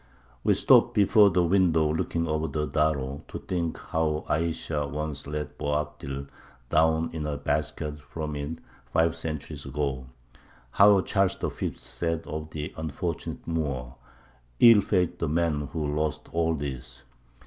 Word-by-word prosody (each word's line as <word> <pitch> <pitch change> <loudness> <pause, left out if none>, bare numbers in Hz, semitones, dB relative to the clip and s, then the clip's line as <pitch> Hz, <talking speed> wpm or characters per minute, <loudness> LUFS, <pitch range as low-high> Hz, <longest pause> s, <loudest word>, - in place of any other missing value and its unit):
We - - +4
stop - - +5
before 105 0 +6
the 90 -2 +2
window 85 -4 +3
looking 85 +1 -1
over 75 0 0
the 75 +1 -2
Darro 75 -2 0
to - - -6
think 85 -3 -3
how 80 -1 -1
Ayesha 80 -2 -1
once 75 -2 -4
let 75 -1 -5
Boabdil 75 -2 -3 0.4
down 80 +1 +3
in 75 -2 -3
a 75 -1 -2
basket 75 0 -2
from 75 0 -5
it 75 +3 -4 0.3
five 80 +2 +2
centuries 75 -2 -5
ago; 70 -2 -3 0.6
how 100 +3 +6
Charles 95 -1 +1
the - - -2
Fifth - - -4
said 85 -1 -2
of 75 0 -5
the 75 0 -5
unfortunate 80 +2 -4
Moor, 70 -7 -2 0.7
"Ill 115 -3 +8
fated 90 -3 +1
was 90 - -24
the 85 - 0
man 75 -3 0
who 75 -2 -2
lost 75 0 -2
all 80 -1 +1
this!" 65 -3 -6
75 Hz, 150 wpm, -27 LUFS, 75-85 Hz, 0.7 s, Ill